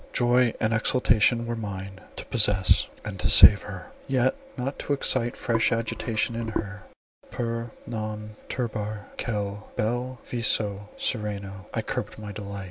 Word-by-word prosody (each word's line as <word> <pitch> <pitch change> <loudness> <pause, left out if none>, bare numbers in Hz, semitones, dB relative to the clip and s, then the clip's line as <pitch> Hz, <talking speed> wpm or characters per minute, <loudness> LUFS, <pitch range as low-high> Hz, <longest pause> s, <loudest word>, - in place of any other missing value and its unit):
Joy 120 -1 +3
and 110 0 +1
exultation, 115 0 +2
were 120 0 -3
mine, 95 -3 -6
to - - -7
possess, 105 -5 +6 0.2
and - - -6
to - - +1
save - - +9
her. - - -9 0.2
Yet 130 -1 +2 0.2
not 130 +2 -4
to 145 - -1
excite 130 -3 +1
fresh 115 0 +1
agitation 115 0 -1
in 115 0 -3
her, 105 -2 -4 0.5
"per 115 0 -3 0.2
non 110 -2 -5 0.2
turbar 110 -3 -4
quel 105 -2 -3
bel 120 +4 -2
viso 105 -4 -1
sereno," 100 -4 -4
I 110 - -2
curbed 110 -2 -4
my 105 -1 -7
delight. 100 -1 -7
110 Hz, 140 wpm, -26 LUFS, 105-120 Hz, 0.5 s, save